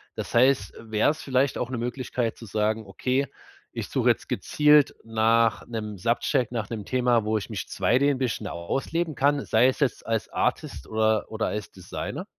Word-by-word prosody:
Das - - -5
heißt, 125 -5 +3
wär's 110 +7 0
vielleicht 130 0 +1
auch 125 - -2
'ne 125 - -2
Möglichkeit 120 -1 -2
zu 115 - -10
sagen: 110 +1 -1
„Okay, 130 +8 -1 0.5
ich - - -5
suche - - +2
jetzt - - 0
gezielt 150 -1 +4
nach 115 0 +2
'nem 105 -3 -5
Subject 120 +4 0
nach 115 -4 -3
'nem 110 -4 -5
Thema, 125 -3 +2
wo 110 0 +1
ich 95 - -5
mich - - -5
2D 130 +5 +2
'n 135 - -1
bisschen 130 -3 -2
ausleben 150 - -2
kann“, 140 +1 +2
sei 115 +3 +4
es 130 - 0
jetzt 140 -5 0
als 115 -1 -1
Artist - - -2
oder 110 -1 +1
oder 110 0 -1
als 105 -1 -4
Designer? 95 -2 -6
115 Hz, 180 wpm, -26 LUFS, 110-130 Hz, 0.5 s, gezielt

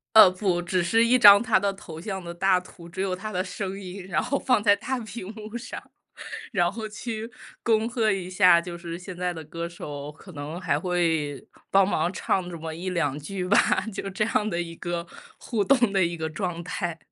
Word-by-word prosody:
呃， 215 -4 +10
不， 185 -2 0
只 180 +1 0
是 225 +7 +3
一 245 +2 +4
张 205 -3 +9
他 225 -2 +3
的 200 +1 0
头 165 -4 -10
像 190 +1 -4
的 170 - -6
大 185 +1 +3
图， 175 -1 -13
只 175 +2 -7
有 190 -1 0
他 215 +3 -6
的 180 - 0
声 195 +1 -5
音， 185 0 -8
然 190 - 0
后 280 +2 0
放 250 -5 +2
在 205 -1 +5
大 260 +6 -3
屏 220 -3 -7
幕 215 +1 -7
上， 250 +1 -7 0.7
然 175 -5 +2
后 215 +2 -6
去 220 +1 -5 0.4
恭 225 -1 +2
贺 230 -3 +1
一 185 -2 -3
下， 180 -2 +6
就 170 0 -7
是 170 -1 -6
现 180 +1 -9
在 180 0 -2
的 160 - -7
歌 170 +2 -5
手 150 -3 -7
可 160 +5 -15
能 155 +2 -6
还 155 -6 +1
会 160 -5 0 0.2
帮 195 -1 +5
忙 170 -3 +1
唱 185 -1 -1
这 175 - -6
么 160 0 -6
1-2 165 -4 -2
句 185 +5 -4
吧， 205 - +5 0.3
就 195 - -4
这 195 +3 0
样 215 -1 0
的 175 -3 -1
一 165 -1 -8
个 175 -1 -3 0.3
互 220 -5 -1
动 240 -2 +3
的 195 -2 +3
一 170 0 -2
个 160 -1 -3
状 175 -1 -3
态。 175 -1 -3
185 Hz, 230 characters per minute, -26 LUFS, 170-210 Hz, 0.7 s, 呃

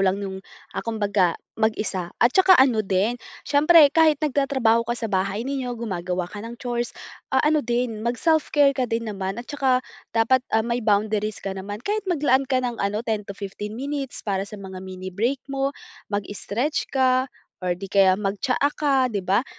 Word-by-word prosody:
lang 190 0 +2
yung, 190 0 -5 0.3
ah, - - -3
kumbaga 205 -6 +1 0.2
mag-isa. 210 -5 -1
At 240 +2 +3
saka 375 -1 +6
ano 255 -5 +4
din, 205 +4 0 0.2
siyempre 295 0 +6
kahit 315 -2 +4
nagtatrabaho 260 -5 +2
ka 240 - 0
sa 225 -1 -3
bahay 195 +4 0
ninyo 265 -2 -3
gumagawa 180 -5 -3
ka 205 +4 -8
ng 230 +2 -8
chores, 240 -1 -3 0.3
ah, - - +2
ano 305 0 +3
din 240 -2 -1
mag 235 +2 -1
self 320 +2 +2
care 285 -2 +4
ka 255 -2 -1
din 230 +1 -1
naman. 195 +1 -4
At 240 - -6
saka 265 -3 +1 0.3
dapat, 235 +3 +4 0.2
ah, 220 - +2
may 235 +1 -1
boundaries 215 0 +1
ka 195 - -2
naman 205 +4 -7
kahit 415 -1 -2
maglaan 275 -5 +2
ka 260 - +2
ng 240 -2 -3
ano 210 +3 -1
10 220 -2 -1
to 200 - -7
15 205 +2 -6
minutes 275 0 -4
para 200 -1 -2
sa 210 - -9
mga 190 -2 -8
mini 185 0 -7
break 240 +8 -1
mo, 275 0 -2 0.3
mag-strech 205 +7 -2
ka 260 0 +2 0.3
or 180 -1 -1
di 195 +2 -8
kaya 190 -1 +4
mag-tsaa 210 +8 0
ka 295 -2 0 0.2
di 200 - -1
ba? 195 +7 +1
230 Hz, 185 wpm, -23 LUFS, 200-265 Hz, 0.3 s, saka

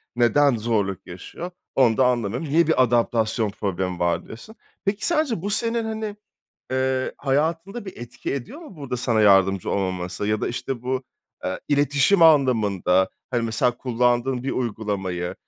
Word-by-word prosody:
neden 120 +3 +4
zorluk 105 -4 -1
yaşıyor, 95 - -8 0.2
onu 120 -4 +4
da 130 - +4
anlamıyorum. 125 +3 -1
Niye 165 +3 +3
bir 160 -5 +4
adaptasyon 115 -2 +1
problemi 95 -3 -3
var, 85 -1 0
diyorsun. 120 - -11 0.3
Peki, 200 +1 -1
sence 310 - +1
bu 200 - -3
senin, 230 +2 0
hani, 220 -1 -4 0.6
eee, 130 0 0
hayatında 165 - -1
bir 190 - -9
etki 120 +3 -5
ediyor 140 - -7
mu? 300 - -12
Burada 140 -4 -4
sana 120 -2 +1
yardımcı 95 -2 +4
olmaması 95 0 -2
ya 105 0 0
da, - - -1
işte, 125 0 -4
bu, 130 +1 -2 0.4
eee, 95 - -3
iletişim 145 +5 +3
anlamında, 110 - +4 0.2
hani, 120 -2 0
mesela, 115 +2 0
kullandığın 125 +1 0
bir 135 - -2
uygulamayı 100 -7 -3
125 Hz, 150 wpm, -23 LUFS, 105-145 Hz, 0.6 s, neden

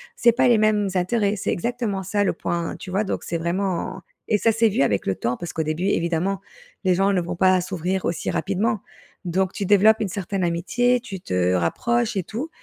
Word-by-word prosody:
c'est 240 - +5
pas 255 +2 +2
les 240 - +5
mêmes 210 -2 +2
intérêts, 205 +3 +1
c'est - - -2
exactement 225 -1 -2
ça 205 +2 0
le - - +1
point, 170 0 -3
tu - - -9
vois? 195 +3 0
Donc 195 - -3
c'est 170 - -2
vraiment 185 +2 -2 0.3
et 210 - +4
ça 225 - +3
s'est 225 +1 +3
vu 200 - 0
avec 105 -8 +1
le 95 - 0
temps 125 +1 -2
parce 175 - -6
qu'au 160 - -1
début 155 +4 -2
évidemment, 180 +1 0 0.4
les 185 -1 +3
gens 195 +2 +2
ne 180 - +2
vont 175 +1 -4
pas 185 -1 +4
s'ouvrir 185 +1 -2
aussi 170 - -2
rapidement, 200 +2 0 0.4
donc 185 +2 0
tu 200 - -3
développes 205 +3 +5
une 205 - -1
certaine 195 0 -3
amitié, 240 +9 +1
tu 195 -6 -8
te 90 0 0
rapproches 230 - 0
et 185 - 0
tout, 250 - -5
190 Hz, 215 wpm, -23 LUFS, 175-215 Hz, 0.4 s, c'est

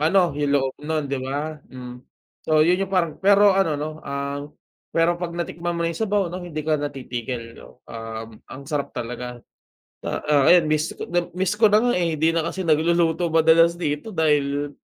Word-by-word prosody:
ano 175 +1 +3
yung 145 0 -1
loob 135 -1 -1
nun 155 0 -2
di 140 -1 -3
ba, 145 +3 -4
hmm. 125 -1 -9 0.5
So 155 -1 +3
yun 180 +2 +3
yung 195 0 -3
parang 170 -4 +2
pero 200 +1 +6
ano, 190 -6 +1
no, 150 +1 -3
ang 140 +1 -5 0.4
pero 170 +1 +2
'pag 170 -1 -4
natikman 175 0 -3
mo 170 - -1
yung 165 -1 -2
sabaw, 205 -4 +1
no, 180 - -5
hindi 170 -3 -5
ka 155 -1 +1
na 145 - -1
titigil, 120 -3 -6
no. - - -17
Um, 115 -1 -7
ang 135 +1 -9
sarap 145 -1 -3
talaga, 125 0 -6 0.6
ah, 145 -2 +1
ayan, 175 -3 +6
miss 155 +2 0
ko - - -5
nab 175 0 -1
miss 190 +1 +1
ko 225 - +6
na 210 - +5
nga, 245 - +3
eh, 165 -2 0
hindi 160 +2 +3
na 165 - +1
kasi 185 +1 -4
nagluluto 165 +1 +2
madalas 165 +1 +4
dito 150 +4 -3
dahil 145 -4 0
155 Hz, 195 wpm, -23 LUFS, 140-175 Hz, 0.6 s, pero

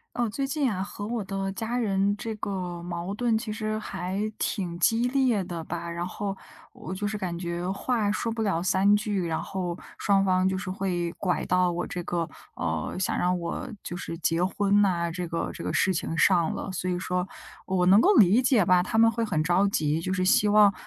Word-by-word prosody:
呃， 240 -2 +1
最 270 +5 -2
近 270 -4 0
啊， 185 - -2
和 205 +1 -6
我 230 0 -2
的 195 0 -3
家 225 +5 -3
人 200 -3 +1
这 225 +1 -4
个 180 -4 -4
矛 175 +2 -4
盾 230 0 +1
其 220 -1 -3
实 215 0 -2
还 190 -3 -4 0.2
挺 175 -4 -2
激 225 +7 +3
烈 250 -6 +2
的 175 -2 -5
吧， 170 +1 -5
然 170 +1 -3
后 195 +1 -4 0.4
我 185 - -7
就 205 +2 -3
是 215 +1 -2
感 175 -3 -3
觉 175 0 -3
话 210 +1 0
说 225 +2 -1
不 225 - -4
了 190 -6 0
3 190 +3 +4
句， 205 -4 -1
然 160 -1 -1
后 180 -2 -4 0.2
双 195 -1 +3
方 185 0 +3
就 190 - -1
是 185 0 -4
会 180 -3 -2
拐 185 -3 0
到 180 0 +2
我 175 +1 -2
这 175 - -4
个 170 -1 -2 0.3
呃， 80 -2 -2
想 185 - 0
让 180 0 +1
我 170 +9 -4 0.2
就 175 - -5
是 165 - -5
结 165 +1 +1
婚 200 +2 +2
呐， 175 -4 +2
这 175 0 -4
个 165 0 -2
这 - - -8
个 - - -2
事 190 - +3
情 165 -1 -3
上 170 -2 +3
了。 190 - -5
所 185 0 -2
以 180 - -1
说 180 0 -2 0.4
我 185 -2 +1
能 195 +3 +7
够 405 - +5
理 210 - +6
解 245 -5 +4
吧， 180 0 +4
他 225 - -3
们 225 0 +6
会 230 0 -2
很 155 -8 0
着 180 +4 +3
急， 155 -4 0
就 185 - -2
是 185 -1 0
希 200 +2 +4
望 205 -1 +6
190 Hz, 235 characters per minute, -27 LUFS, 175-210 Hz, 0.4 s, 能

